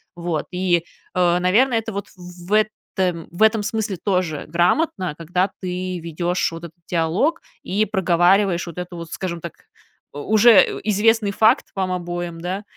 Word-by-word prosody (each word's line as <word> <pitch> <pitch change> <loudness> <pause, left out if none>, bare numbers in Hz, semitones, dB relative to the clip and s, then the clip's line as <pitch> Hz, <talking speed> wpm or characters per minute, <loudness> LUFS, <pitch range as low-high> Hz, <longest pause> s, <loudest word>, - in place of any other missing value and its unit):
Вот. 170 -2 -3
И, 180 -2 +1 0.3
э, 175 -1 +3
наверное, 225 +8 +3
это 225 -1 -3
вот 200 0 -4
в 180 0 -12
этом 190 -5 -1
в 175 +5 0
этом 220 0 +4
смысле 210 -2 -2
тоже 180 -6 -1
грамотно, 180 - +1
когда 180 +4 0
ты 185 0 -3
ведешь 170 +2 -1
вот 165 0 -9
этот 165 -1 -12
диалог 180 - 0 0.2
и 205 +3 0
проговариваешь 185 -1 +2
вот 170 - -9
это 180 0 -6
вот, 170 -1 -8
скажем 175 -3 -4
так, 170 0 -7 0.6
у 145 +9 -4
уже 220 -1 +6
известный 215 +1 +2
факт 220 +5 +3
вам 190 -1 -1
обоим. 175 -1 -5
Да. 185 +4 -4
180 Hz, 155 wpm, -21 LUFS, 170-205 Hz, 0.6 s, уже